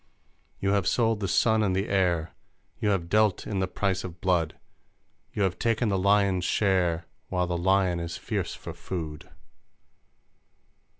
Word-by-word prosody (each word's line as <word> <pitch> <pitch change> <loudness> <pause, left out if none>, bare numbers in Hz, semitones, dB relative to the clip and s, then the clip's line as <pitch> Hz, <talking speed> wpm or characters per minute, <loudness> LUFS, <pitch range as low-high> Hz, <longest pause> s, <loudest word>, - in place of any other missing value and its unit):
You 100 - +1
have 100 -3 +1
sold 115 -3 +2
the 100 - -2
sun 110 +4 +3
and 95 -3 +1
the 95 +2 0
air, 90 -4 +1 0.5
You 105 - +1
have 95 -4 0
dealt 105 0 +2
in 100 -3 -2
the 95 - 0
price 95 0 -1
of 90 -2 -8
blood, 90 -3 0 0.7
You 105 - -1
have 95 -1 -1
taken 115 0 +1
the 95 -2 +1
lion's 100 -1 +3
share 90 -4 +1 0.2
While 90 -1 0
the 90 0 -2
lion 95 0 +2
is 85 0 -4
fierce - - -3
for - - -8
food! 80 -5 -6
95 Hz, 160 wpm, -27 LUFS, 90-100 Hz, 0.7 s, sun